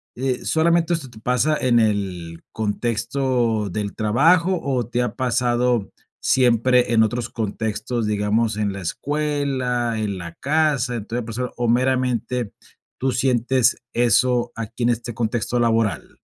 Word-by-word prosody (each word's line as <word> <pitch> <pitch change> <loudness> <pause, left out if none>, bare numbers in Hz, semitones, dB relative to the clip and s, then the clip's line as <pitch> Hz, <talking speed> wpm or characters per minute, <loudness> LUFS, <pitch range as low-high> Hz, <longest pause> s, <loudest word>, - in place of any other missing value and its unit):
eh, 130 0 -2
¿solamente 170 +1 +2
esto 145 -6 -3
te 110 -2 -14
pasa 125 +7 +1
en 120 -2 +3
el 95 -6 -1
contexto 115 0 -1
del 100 +2 -3
trabajo, 165 - +3
o, 125 -5 -1
te 125 0 -1
ha 120 - -3
pasado 120 -3 +1 0.3
siempre 125 -1 +3
en 110 -1 +5
otros 120 +2 -2
contextos? 110 +1 -3
Digamos, 105 +1 0
en 105 -2 -1
la 100 - -6
escuela, 130 - -1
en 100 -3 -2
la 85 -1 -7
casa. 140 -4 0
Entonces, 115 +2 -4
por 115 - -7
eso 125 +2 -4
¿O 120 -1 0
meramente 125 -2 0 0.5
tú 130 0 0
sientes 125 -1 +2 0.2
eso 120 +1 +2
aquí 115 +1 -7
en 120 - +3
este 120 0 -2
contexto 120 +1 -1
laboral? 115 -3 0
120 Hz, 140 wpm, -22 LUFS, 110-130 Hz, 0.5 s, en